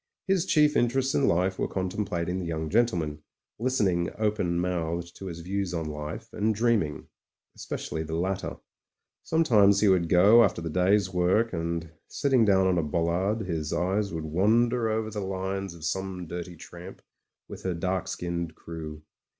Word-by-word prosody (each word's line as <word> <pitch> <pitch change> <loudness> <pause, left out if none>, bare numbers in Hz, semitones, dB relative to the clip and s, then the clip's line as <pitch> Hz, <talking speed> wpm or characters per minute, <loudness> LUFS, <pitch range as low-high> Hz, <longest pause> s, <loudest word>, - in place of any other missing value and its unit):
His 190 -2 +1
chief 150 -3 +4
interests 130 +2 +2
in 140 - +2
life 90 +2 +1
were - - 0
contemplating 95 -2 -2
the 90 - -4
young 80 -1 -3
gentleman, 85 -10 +1 0.4
listening 100 -9 +1
open 105 -5 0
mouthed 85 -1 -2
to 95 - -7
his 85 -2 -6
views 95 0 -2
on 80 -1 -2
life, 75 +8 -6
and, 110 +1 0
dreaming. 110 -9 +1 0.5
Especially 80 - -5
the 80 0 -4
latter. 95 +3 -2 0.6
Sometimes 110 -12 +4
he 105 - +4
would 90 -4 +3
go 105 +7 +7
after 95 -5 +1
the 85 -1 -4
day's 95 +2 +2
work, 95 +6 +2
and, 85 -1 -3 0.2
sitting 130 -5 +2
down 95 -2 +4
on 90 -2 +2
a - - 0
bollard, 85 +7 0
his 80 -4 -3
eyes 95 +4 0
would 80 -1 -4
wander 115 +8 +2
over 110 0 -1
the 105 - -4
lines 95 -1 -3
of 80 -2 -8
some 95 +1 -3
dirty 85 +1 -6
tramp, 90 +3 -11 0.4
with - - -9
her 95 -2 -2
dark 90 +2 -2
skinned 85 -2 -4
crew. 80 -2 -8
95 Hz, 165 wpm, -27 LUFS, 85-105 Hz, 0.6 s, go